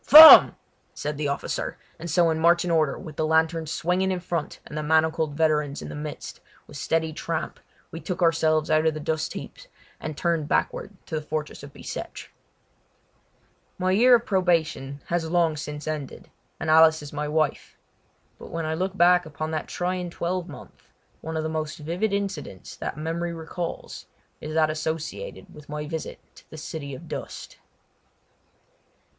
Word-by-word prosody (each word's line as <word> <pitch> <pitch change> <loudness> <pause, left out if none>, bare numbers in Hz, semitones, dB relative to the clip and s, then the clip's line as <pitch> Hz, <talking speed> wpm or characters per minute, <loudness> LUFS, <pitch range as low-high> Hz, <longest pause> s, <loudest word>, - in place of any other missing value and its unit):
"Form!" 315 +2 +11 0.4
said 150 0 -3
the 150 - 0
officer, 140 - -3 0.2
and 170 +2 -6
so 165 +1 +3
in 160 - -1
marching 170 +1 +3
order, 155 -4 +2
with 155 -5 -10
the - - 0
lanterns 160 0 +1
swinging 180 +4 0
in 185 - -1
front 170 -3 -4
and - - -9
the 155 - -2
manacled 160 -1 +1
veterans 150 -2 +1
in - - -7
the - - -7
midst, 150 -1 -7 0.3
with - - -14
steady 160 -1 -1
tramp 165 +1 -4 0.3
we 165 - -6
took 175 +3 -4
ourselves 160 -2 +2
out 155 +1 +3
of 155 - +1
the - - -4
dustheaps 155 +1 -4 0.3
and 155 - -6
turned 165 -4 0
backward - - 0 0.2
to - - -12
the 155 - 0
fortress 155 0 -4
of 140 0 -10
Bicêtre. - - -7 1.5
My 185 0 +1
year 245 +6 +6
of 235 - 0
probation 160 -7 0
has 170 -2 -1
long 170 -2 +2
since 150 0 -6
ended, 150 -3 -5 0.3
and - - -4
Alice 160 -1 +6
is 145 - -9
my 150 0 -2
wife. 155 -1 -1 0.6
But - - -10
when 165 -1 -3
I 155 - -1
look 185 +4 -2
back 180 -1 +5
upon 155 +1 -5
that 155 -1 -3
trying 180 0 -2
twelvemonth 175 -1 -5 0.3
one 160 0 -4
of 155 - -1
the - - -1
most 155 -1 -3
vivid 175 +8 -2
incidents 195 - -4
that - - -5
memory 165 +2 -3
recalls 165 +1 -6 0.3
is 155 +1 -5
that 155 -1 +3
associated 160 - -5
with 150 -1 -14
my 150 0 -4
visit 160 +1 -5 0.2
to - - -18
the 155 - -10
City 145 -2 -6
of - - -11
Dust. - - -7
160 Hz, 170 wpm, -25 LUFS, 155-170 Hz, 1.5 s, Form